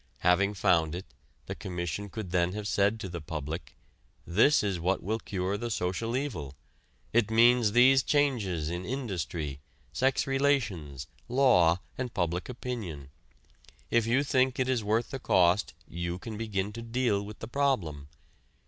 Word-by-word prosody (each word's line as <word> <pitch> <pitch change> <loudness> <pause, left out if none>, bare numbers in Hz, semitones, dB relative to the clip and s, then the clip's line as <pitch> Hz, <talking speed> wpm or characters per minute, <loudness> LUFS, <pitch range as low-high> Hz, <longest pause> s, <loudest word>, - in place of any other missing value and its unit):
Having 100 +3 +3
found 85 -3 +2
it, 90 - -6 0.4
the - - -4
Commission 90 +2 -4
could 100 -3 -6
then 90 0 +1
have 105 0 -4
said 100 +2 +2
to 100 - -5
the 85 -2 -6
public: 80 +1 -6 0.5
"This 110 - +4
is 100 -4 -1
what 90 +3 0
will 110 +5 -1
cure 95 -1 -2
the 120 +2 -4
social 115 +4 -1
evil. 80 - -4 0.6
It 115 -2 +3
means 115 -1 +5
these 130 +2 +6
changes 110 - 0
in 90 +1 -4
industry, 85 - -4 0.3
sex 130 +1 +1
relations, 115 - 0 0.2
law 90 -10 +4 0.2
and 125 -2 -2
public 90 +2 -1
opinion. 105 - -6 0.8
If 115 -1 +3
you 130 +5 +3
think 130 -2 +2
it 130 - +1
is 125 -4 +1
worth 110 +3 0
the 135 - -4
cost 90 -3 +2
you 85 +1 -4
can 110 +3 -7
begin 105 -2 -2
to 115 - -6
deal 115 -3 0
with 105 +1 -9
the 110 - -7
problem. 105 - -1
105 Hz, 155 wpm, -29 LUFS, 85-120 Hz, 0.8 s, these